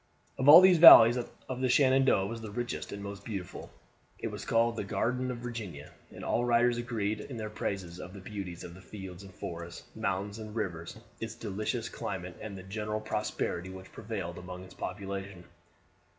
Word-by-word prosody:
Of 130 +2 +4
all 160 +4 +12
these 185 -2 +6
valleys 120 -8 +11
that 125 -1 -3 0.2
of 130 0 -4
Shenandoah 130 -7 +4
was 115 +3 -5
the 110 - -7
richest 120 +4 -4
and 100 0 -6
most 100 0 -7
beautiful. 100 -5 -6 0.5
It - - -4
was - - -7
called 115 0 +2
the - - -3
Garden 125 +6 -1
of 125 - -3
Virginia; 100 -12 -7 0.2
and - - -10
all 120 - +1
writers 120 0 +3
agreed 110 -3 -2
in 125 +2 -8
their 110 -1 -5
praises 95 -4 -4
of 90 - -8
the - - -8
beauties 95 -3 -7
of 85 - -9
its 95 - -14
fields 95 -3 -9
and 100 -1 -12
forests, 85 -1 -7
mountains 100 0 -3
and 110 0 -8
rivers, 85 -5 -4 0.2
its 115 0 -5
delicious 105 -2 -3
climate, 90 -2 -5
and 105 -2 -7
the 95 - -9
general 105 +2 -3
prosperity 95 -4 -3
which 95 0 -10
prevailed 100 -6 -5
among 90 0 -8
its 95 - -13
population. 95 -1 -6
105 Hz, 185 wpm, -30 LUFS, 95-115 Hz, 0.5 s, all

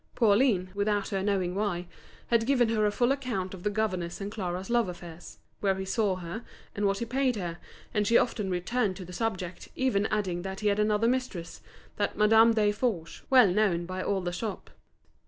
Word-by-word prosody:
Pauline, 205 -4 +3
without 205 0 0
her 195 -1 -1
knowing 190 -3 0
why, 190 -3 -1 0.4
had 230 -1 +2
given 250 -4 +3
her 215 -2 +2
a - - +1
full 240 +4 +2
account 235 -10 -2
of 185 - -8
the 210 - 0
governor's 185 -5 -2
and 200 0 -5
Clara's 185 -3 -4
love 235 -5 +2
affairs: 175 -1 -10 0.2
where 195 -2 +1
he 190 0 -4
saw 200 -1 +1
her, 185 +5 -6 0.3
and 205 0 +1
what 195 0 +1
he 235 - -3
paid 255 +1 +1
her; 175 -4 -4 0.3
and 210 -1 +1
she 230 - +6
often 210 -5 0
returned 190 +3 0
to 185 - -8
the 180 - -10
subject, 185 -4 -3
even 220 -6 +1
adding 190 -5 -1
that 190 +2 -6
he 210 - +2
had 200 +1 +1
another 210 +1 +2
mistress, 245 -9 -2 0.4
that 205 - -1
Madame 225 +2 +6
Desforges, 205 -4 0
well 255 -6 +7
known 180 -3 +1
by 185 +1 -4
all 195 0 0
the 175 -1 -3
shop. 210 +2 -5
205 Hz, 195 wpm, -28 LUFS, 185-225 Hz, 0.4 s, well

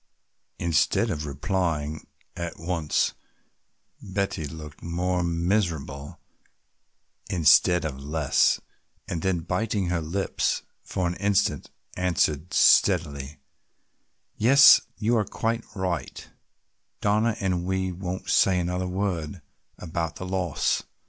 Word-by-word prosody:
Instead 85 +7 +1
of 75 -3 -4
replying 80 0 -2 0.3
at 85 -1 -5
once 85 -2 0 0.9
Betty 95 -4 -2
looked 75 -1 -10
more 90 +2 -1
miserable 85 -5 -2 1.1
instead 85 +1 +4
of 70 -3 -4
less, 75 0 +2 0.5
and 85 -2 -3
then 95 -2 0
biting 95 +2 -1
her 90 -2 0
lips 90 +5 -1 0.2
for 90 - -3
an 85 - 0
instant 100 -1 0 0.3
answered 85 -3 0
steadily: 75 -6 +3 1.0
"Yes, 140 +7 +8 0.2
you 115 +2 +1
are 110 - +2
quite 115 +3 -2
right, 90 -7 -3 0.7
Donna, 105 +2 +1
and 90 -3 -1
we 95 0 -1
won't 90 +1 -5
say 95 -2 +4
another 90 +1 -2
word 90 -3 -3 0.3
about 80 -2 -4
the 95 - -7
loss. 90 -5 0
90 Hz, 105 wpm, -25 LUFS, 80-95 Hz, 1.1 s, Yes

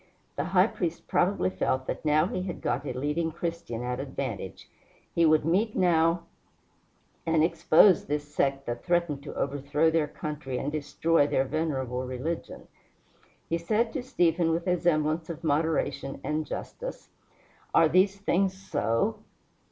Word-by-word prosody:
The - - -2
High - - +4
Priest - - -4
probably 90 +1 +1
felt 130 +8 -1
that - - -4
now 155 +1 +3
he 185 0 -3
had 180 -2 -5
got 135 +4 -2
a - - -2
leading 150 +5 -1
Christian 165 -8 -4
at 125 +1 -3
advantage. 130 -8 -5 0.5
He 170 -1 +4
would 155 -1 +4
meet 205 +7 +1
now 170 -2 +3 1.0
and 160 -1 +2
expose 165 +2 +5
this 145 0 -1
sect 140 -2 0
that 120 0 -4
threatened 170 -5 0
to 140 - -8
overthrow 145 +3 +1
their 160 -2 +2
country 150 -3 -5
and 145 - -2
destroy 155 +1 +1
their 135 -2 +1
venerable 130 -4 -2
religion. 130 +6 -5 0.8
He 165 - -1
said 215 +7 0
to 275 - -2
Stephen, 175 - +1
with 165 +1 0
a 180 -1 +1
semblance 160 -1 +1
of 165 0 -6
moderation 150 -2 0
and 155 0 -2
justice, - - -6 0.6
"Are 165 - +5
these 185 +5 +3
things 195 -1 +1
so?" 180 -12 -1
155 Hz, 150 wpm, -28 LUFS, 140-170 Hz, 1.0 s, expose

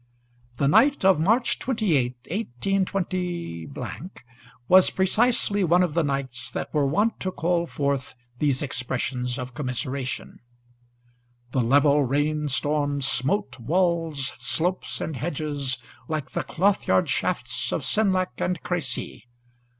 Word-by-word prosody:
The 140 - +2
night 270 - +4
of 190 -5 +5
March 225 +9 +2
28, 170 - +1
182, 180 - -2 0.9
was 185 0 +7
precisely 205 +1 +2
one 175 +1 +4
of 170 -4 -1
the 170 - +2
nights 130 -4 -3
that - - -5
were 145 -2 +2
wont 205 +11 +1
to 185 - -2
call 170 -1 0
forth 140 -4 -2 0.2
these 145 -2 +1
expressions 125 -1 -2
of 125 -2 -6
commiseration. 130 -1 -3 1.1
The 130 - +1
level 145 +4 +4
rain 150 +3 0
storm 145 0 0
smote 140 +8 -1
walls, 165 0 0
slopes, 160 +9 0
and 160 - -3
hedges 145 -4 -1 0.3
like 155 -3 -3
the - - -1
cloth 195 +4 +1
yard 95 0 +3
shafts - - -1
of - - -2
Senlac 190 -4 +2
and 180 -1 0
Crecy. 145 -8 -3
150 Hz, 120 wpm, -25 LUFS, 130-185 Hz, 1.1 s, was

